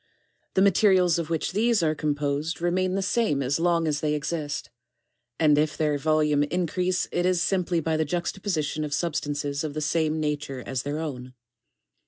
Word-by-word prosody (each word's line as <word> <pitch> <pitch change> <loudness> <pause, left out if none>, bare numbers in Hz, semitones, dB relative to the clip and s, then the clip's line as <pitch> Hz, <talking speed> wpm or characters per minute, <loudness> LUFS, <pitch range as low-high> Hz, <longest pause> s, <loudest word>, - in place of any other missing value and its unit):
The 190 - +4
materials 185 -3 +4
of 165 -1 -4
which 165 -2 -1
these 220 0 +2
are 155 -1 +2
composed 150 +1 -2
remain 185 +2 0
the 195 - 0
same 200 - +1
as 135 +4 0
long 170 -1 +2
as 150 -1 0
they 150 0 0
exist, 150 0 -3 0.7
and 150 -2 +4
if 150 -1 0
their 150 -2 +1
volume 150 -1 +2
increase 180 +4 0
it 175 - 0
is 180 -1 +2
simply 180 -1 +1
by 160 0 0
the 160 - +1
juxta 175 +4 -3
position 155 -6 -1
of 150 -1 -2
substances 145 -3 -2
of 150 -2 -4
the - - -1
same 155 +1 0
nature 145 -4 -3
as 130 0 -2
their 145 +3 -3
own. 130 -5 -6
155 Hz, 180 wpm, -26 LUFS, 145-175 Hz, 0.7 s, The